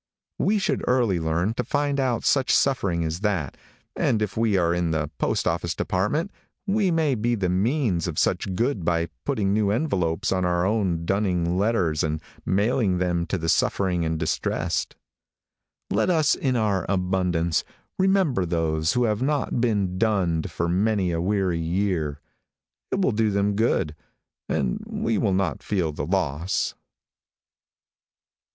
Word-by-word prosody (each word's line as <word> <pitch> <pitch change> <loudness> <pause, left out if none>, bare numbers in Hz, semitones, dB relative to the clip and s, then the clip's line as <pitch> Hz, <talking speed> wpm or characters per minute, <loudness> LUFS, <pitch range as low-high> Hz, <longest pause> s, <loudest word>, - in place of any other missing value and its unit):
We 210 +2 +2
should 200 - -1
early 120 -8 +2
learn 85 +6 0
to - - -2
find 145 -1 0
put 125 -3 0
such 135 -2 +3
suffering 95 -11 +2
as 80 +1 -2
that, 95 -9 -1 0.4
and 110 - +1
if 105 -2 -2
we 110 -3 +2
are 85 -2 +2
in 85 -1 0
the 80 -1 -1
postoffice - - 0
department 145 - -1 0.3
we 200 -1 +2
may 160 -4 +2
be 120 +1 0
the 95 -4 -1
means 100 - +1
of 85 - -4
much 95 - -2
good 115 -3 0
by 85 -1 0 0.2
putting 100 -2 0
new 105 -1 +2
envelopes 95 - 0
on 95 -1 +1
our 90 0 +1
own 95 -6 0
dunning 90 -3 0
letters 95 -6 +1
and 80 0 -1 0.3
mailing 100 -1 +2
them 85 -1 0
to 100 - -1
the 80 -1 -4
suffering 90 +1 +1
and 80 0 -1
distressed. 80 0 -1 1.0
Let - - +2
us, 160 -3 +3
in 130 -3 0
our 105 -6 +1
abundance, 90 -3 0 0.4
remember 190 - +2
those 80 -2 0
who 125 - +2
have 105 -1 0
not 140 -3 0
been 100 -6 0
dunned 95 -7 +1
for 85 - -2
many 95 +1 +1
a 85 0 -1
weary 95 -2 0
year. 80 -4 -1 0.7
It - - 0
will 185 - +3
do 110 0 +1
them 100 0 +1
good, 105 -8 +1 0.6
and 65 -3 -1
we 115 -2 -1
will 100 -5 +1
not 95 -2 -1
feel 90 -6 -1
the 75 -1 -5
loss. 85 -2 -1
95 Hz, 155 wpm, -24 LUFS, 85-115 Hz, 1.0 s, such